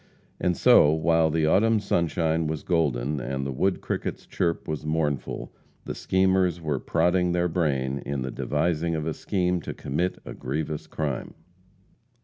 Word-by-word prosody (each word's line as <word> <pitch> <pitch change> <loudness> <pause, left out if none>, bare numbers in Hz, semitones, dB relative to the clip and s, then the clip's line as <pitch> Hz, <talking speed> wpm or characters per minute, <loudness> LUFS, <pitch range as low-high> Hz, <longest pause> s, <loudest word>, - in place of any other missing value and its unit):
And 90 -1 +1
so, 75 - +6
while 80 0 +3
the 80 0 +1
autumn 110 +7 +4
sunshine 80 -4 0
was 80 -1 -3
golden, 75 -4 0
and 65 +1 -3
the 70 - -2
wood 95 +9 0
cricket's - - -4
chirp 85 -1 -1
was 75 -1 -3
mournful, 75 -3 -2 0.3
the - - -4
schemers 95 -2 +2
were 75 -5 -2
prodding 90 +3 +1
their 90 0 +2
brain 70 -6 0
in 70 -2 -3
the 65 - -4
devising 80 +4 0
of 80 -1 -2
a 80 - -1
scheme 90 -2 -1
to - - -6
commit 85 +7 -2
a - - -6
grievous 75 +3 -4
crime. 75 -5 -3
80 Hz, 155 wpm, -26 LUFS, 75-90 Hz, 0.3 s, so